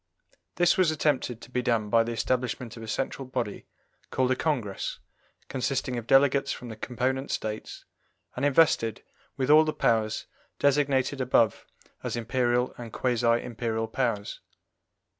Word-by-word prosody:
This 175 0 +3
was 185 -4 +5
attempted 140 -6 0
to - - -13
be 125 - 0
done 115 -4 0
by 115 - +6
the 115 - -4
establishment 120 0 -2
of 115 - -9
a 110 - -8
central 135 +3 -3
body 125 -5 -4 0.4
called 130 0 +1
a - - +3
Congress, 125 -11 -2 0.5
consisting 130 -1 -2
of 120 -1 -5
delegates 140 0 +4
from 125 - -6
the 110 - -6
component 130 +4 -2
States, 110 0 -4 0.5
and 125 - -4
invested 140 -6 +3 0.3
with 135 +2 +1
all 155 +1 +8
the 155 -1 -1
powers 110 -2 +1 0.3
designated 140 -1 +2
above 115 -4 +2 0.3
as - - -3
Imperial 120 +1 0
and 115 -2 -7
quasi 120 0 0 0.2
Imperial 115 -1 -2
powers. 110 -4 -2
125 Hz, 145 wpm, -27 LUFS, 115-135 Hz, 0.5 s, all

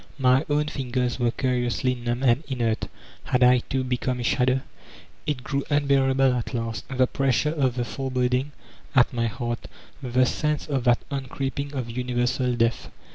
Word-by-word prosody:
My 130 +1 +4
own 150 +1 +2
fingers 125 -3 -2
were 120 -1 +2
curiously 125 0 0
numb 120 +1 -3
and 125 +3 +3
inert; 120 -5 -1 0.4
had 125 -1 +2
I, 125 0 +6
too, 130 +2 -2
become 125 0 -1
a - - -3
shadow? 130 +2 +2 0.7
It 140 -4 -2
grew 140 +1 -1
unbearable 135 -2 +3
at 125 +1 -3
last, 115 -1 -3
the 130 -1 +3
pressure 135 +3 +1
of 135 -6 +1
the 120 -1 -1
fore 125 +5 -4
boding 125 +2 0 0.4
at 125 -1 +5
my 115 -1 0
heart, 120 +1 -4 0.3
the 130 -1 +2
sense 150 +2 -1
of 135 -4 -2
that 120 0 +3
on 135 -2 -3
creeping 140 +2 -4
of 130 -3 -2
Universal 125 +1 0
Death. 115 0 0
125 Hz, 170 wpm, -25 LUFS, 120-135 Hz, 0.7 s, I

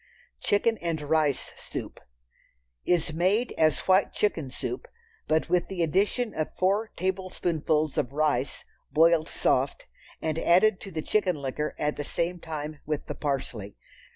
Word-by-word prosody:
Chicken 220 +2 +2
and 165 -2 -1
Rice 150 -2 +1
Soup - - -6 0.9
Is 170 -3 +2
made 190 +9 +2
as 155 -1 +3
white 190 +1 +3
chicken 165 -9 0
soup, 370 - -5 0.4
but 155 +1 +2
with 175 0 +2
the 185 -3 -1
addition 205 +8 +1
of 155 -1 -3
four 200 +4 +2
tablespoonfuls 170 -5 0
of 130 -3 -1
rice, 145 -2 0 0.3
boiled 160 +2 +5
soft, - - 0 0.3
and 160 0 -1
added 185 +4 +4
to - - -7
the 160 -2 -3
chicken 190 -4 +1
liquor 145 +1 -3
at 150 0 -1
the 145 - -2
same 170 +4 -2
time 155 -2 -5
with 150 -1 -3
the - - -4
parsley. 125 -8 -3
160 Hz, 145 wpm, -27 LUFS, 150-185 Hz, 0.9 s, boiled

